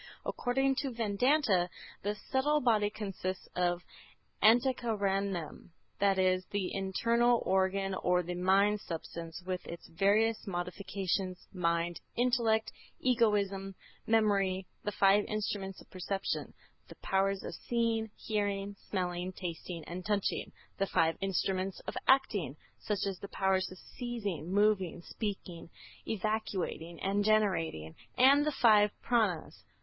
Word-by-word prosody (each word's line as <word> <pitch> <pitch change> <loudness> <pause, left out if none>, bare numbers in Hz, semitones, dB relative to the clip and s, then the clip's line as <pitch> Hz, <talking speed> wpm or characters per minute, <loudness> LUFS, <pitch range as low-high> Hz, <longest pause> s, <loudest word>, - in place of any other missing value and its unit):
According 270 +2 +1
to 275 - -1
Vedanta, 225 - +2 0.3
the 205 +1 -1 0.2
subtle 295 +3 +3
body 220 -6 +3
consists 195 -3 -5
of 175 0 +1 0.6
Antahkaranam, 200 - +1 0.3
that 195 -1 +3
is, 185 0 +3
the 200 -3 -2
internal 230 +5 +2
organ 190 +1 +1
or 180 -1 +1
the 175 +1 -4
mind 195 +3 +3
substance 165 +1 -6
with 185 -1 -3
its 170 - -8
various 210 +6 +2
modifications, 185 0 -3
mind, 170 -1 0
intellect, 235 -3 +2 0.3
egoism, 205 -6 +1 0.3
memory, 200 -4 +2 0.2
the 210 - -1
five 200 +1 +4
instruments 200 -2 -3
of - - -17
perception: 195 +1 -3 0.4
the - - -12
powers 195 0 +1
of - - -5
seeing, 230 -2 -1
hearing, 205 -2 -2
smelling, 180 -1 -2
tasting 170 -2 -6
and 180 +2 -6
touching; 205 -1 -1 0.3
the 195 - +1
five 165 -2 +2
instruments 195 0 -1
of - - -6
action, 210 - +3 0.2
such 205 -2 -2
as 195 -2 -3
the 200 - -7
powers 190 -1 0
of 185 - -10
seizing, 205 - -5
moving, 195 -4 +2
speaking, 190 -6 -5 0.4
evacuating, 195 -5 -2
and 200 +1 +1
generating, 185 - +1 0.2
and 280 +4 +6
the - - +2
five 215 -6 +5 0.2
_Prânas. 215 -9 0
195 Hz, 120 wpm, -32 LUFS, 185-220 Hz, 0.6 s, and